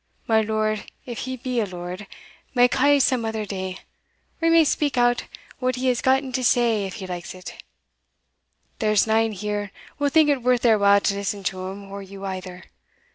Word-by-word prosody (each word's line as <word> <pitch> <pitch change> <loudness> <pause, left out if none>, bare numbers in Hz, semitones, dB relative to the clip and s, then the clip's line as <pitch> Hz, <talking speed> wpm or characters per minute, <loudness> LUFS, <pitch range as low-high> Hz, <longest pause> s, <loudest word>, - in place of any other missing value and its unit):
My 220 -1 +3
lord, 215 0 -1 0.2
if 240 -2 -6
he 260 0 -4
be 250 0 -2
a 220 - +1
lord, 180 +2 -7 0.5
may 245 0 +6
ca' 285 +3 +4
some 255 -3 +2
other 220 -1 -2
day 190 -2 -5 0.6
or 330 - +2
he - - +4
may 330 0 +7
speak 290 -2 0
out 245 0 +2 0.3
what 255 -1 0
he 255 +1 0
has 245 - 0
gotten 265 0 +2
to 255 0 -1
say 235 -4 +2
if 190 - -8
he 200 -4 -6
likes 180 -1 -6
it; 185 0 -10 1.2
there's 215 -2 +3
nane 225 0 +2
here 205 0 -3 0.3
will 290 0 +2
think 315 +1 +5
it 280 -3 +2
worth 250 0 +2
their 225 -3 +5
while 200 0 +5
to 200 - +1
listen 200 0 -3
to 185 0 -3
him 195 +1 -8
or 200 0 -6
you 195 0 -9
either. 185 -1 -6
220 Hz, 195 wpm, -23 LUFS, 195-255 Hz, 1.2 s, may